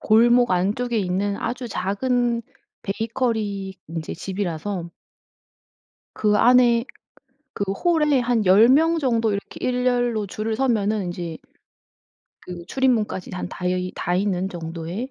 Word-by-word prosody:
골목 240 +2 +4
안쪽에 215 +6 0
있는 200 +1 -1
아주 240 +3 -4
작은 235 +4 0 0.4
베이커리 210 -3 -2
인제 165 -1 -5
집이라서 185 -1 -4 1.2
그 210 -1 +2
안에 240 0 +5 0.7
그 200 - -2
홀에 300 - +2
한 240 -3 +1
10 205 +6 +7
명 325 +5 +4
정도 230 -6 +1
이렇게 200 0 -5
일렬로 245 -3 +1
줄을 215 +3 -3
서면은 215 -6 +1
인제 175 -2 -5 1.0
그 175 -1 -9
출입문까지 230 -7 0
한 180 -1 -4
닿여이 180 0 -2
닿이는 185 +1 -1
정도의 170 +7 -6
215 Hz, 240 characters per minute, -23 LUFS, 185-245 Hz, 1.2 s, 10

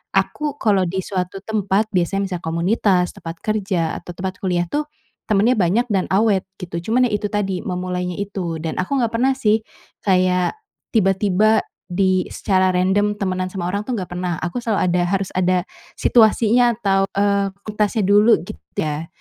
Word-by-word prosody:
aku 295 -2 0
kalau 200 -8 +2
di 190 +1 -2
suatu 190 0 -4
tempat 215 0 0
biasanya 185 +1 0
misal 180 - -2
komunitas, 180 +2 +1
tempat 165 0 -8
kerja 195 -6 -1
atau 175 - -9
tempat 185 0 -5
kuliah 180 -2 0
tuh, 295 +1 -1 0.4
temennya 215 +5 +3
banyak 210 +5 +2
dan 190 - +1
awet 200 -1 +3 0.2
gitu. 170 -2 -5
Cuman 250 +1 +4
ya - - -6
itu 205 0 -3
tadi, 195 -3 -1
memulainya 180 0 -3
itu 185 -5 -3
dan 160 0 -4
aku 270 +8 -1
nggak 230 -1 0
pernah 260 +3 +3
sih 215 -2 +2 0.4
kayak 185 - +2 0.4
tiba-tiba, 205 +1 +3 0.3
di 185 0 +2
secara 185 -1 +1
random 205 +3 +2
temenan 185 -1 -1
sama 180 -3 -3
orang 200 +3 -2
tuh 255 - -5
nggak 185 -4 -5
pernah 180 -1 -2
aku 175 +8 -3
selalu 220 -3 0
ada, 180 0 +2
harus 195 0 -1
ada 185 -1 +2 0.4
situasinya 235 +1 +4
atau, 195 -2 +2
eee, 200 0 +2 0.2
kualitasnya 210 0 0
dulu 210 +3 +5
gitu 75 - -9 0.2
ya 155 +1 -2
195 Hz, 165 wpm, -20 LUFS, 180-215 Hz, 0.4 s, dulu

